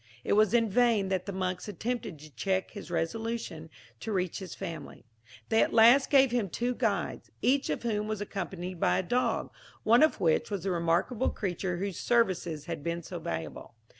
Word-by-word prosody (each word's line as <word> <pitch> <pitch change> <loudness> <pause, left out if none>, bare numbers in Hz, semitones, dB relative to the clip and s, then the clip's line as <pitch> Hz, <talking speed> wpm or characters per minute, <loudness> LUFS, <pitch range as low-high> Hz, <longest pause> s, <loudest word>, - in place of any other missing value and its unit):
It - - +1
was 215 0 +4
in 230 -1 +4
vain 220 -2 +2
that 190 0 -1
the - - -2
monks 185 0 -3
attempted 220 -1 -4
to 150 0 -14
check 190 +10 -1
his 205 - -9
resolution 170 0 -3 0.3
to 220 - -5
reach 185 -3 -1
his 190 -2 -7
family. 170 -9 -7 0.4
They 225 0 +4
at - - +1
last 240 +5 +7
gave 270 -3 +5
him 235 -5 0
two 245 +7 -1
guides, 210 -8 -2
each 270 +4 +2
of - - -2
whom 210 -2 -1
was 215 -1 -2
accompanied 185 -3 -5
by - - +3
a - - 0
dog, 245 +8 0 0.3
one 235 +3 +5
of 310 - +4
which 160 -2 +2
was 200 -3 -3
the 195 - -1
remarkable 175 +8 +1
creature 180 -2 -3
whose 195 0 -3
services 180 -10 +1
had - - -5
been 170 +1 -3
so 175 +2 -6
valuable. 80 - -6
195 Hz, 190 wpm, -29 LUFS, 175-230 Hz, 0.4 s, last